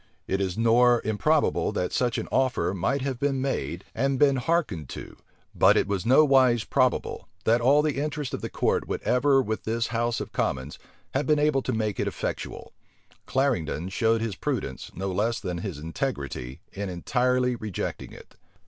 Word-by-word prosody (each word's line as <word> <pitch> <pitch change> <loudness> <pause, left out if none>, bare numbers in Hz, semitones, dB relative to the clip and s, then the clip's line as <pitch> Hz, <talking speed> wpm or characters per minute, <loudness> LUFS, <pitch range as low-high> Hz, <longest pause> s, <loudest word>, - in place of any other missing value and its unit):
It 95 +1 -1
is 95 -1 -2
nor 120 +1 +5
improbable, 145 +8 +1
that 90 - -2
such 120 -2 +1
an - - -3
offer 130 -8 +1
might 100 +9 -1
have 135 -3 -3
been 140 -1 0
made, 90 - -3
and 135 +2 0
been 140 0 +4
hearkened 125 - -1
to; - - -8 0.4
but - - +5
it 100 - +1
is 100 +2 -1
nowise 130 -4 +5
probable, - - 0 0.2
that 115 +2 +3
all 140 +5 +5
the 150 -3 0
interest 150 -3 -3
of - - -3
the - - -4
court - - 0
would - - -3
ever 135 +1 +3
with 110 -1 -3
this 115 +1 -1
house 120 0 0
of - - -6
commons, 65 +2 -2 0.3
have 135 +2 0
been 150 -1 +4
able 145 -2 +2
to 130 - -2
make 110 -3 -1
it - - 0
effectual. - - -5 0.5
Clarendon 105 - 0
showed 110 +3 +1
his 115 -4 -2
prudence, 110 - -3
no 95 +2 -3
less 110 +5 0
than 90 -4 -4
his 90 -4 -5
integrity, 75 - -4
in 100 0 -4
entirely 125 +7 +1
rejecting 110 -5 -5
it. - - -14
120 Hz, 175 wpm, -26 LUFS, 95-135 Hz, 0.5 s, nor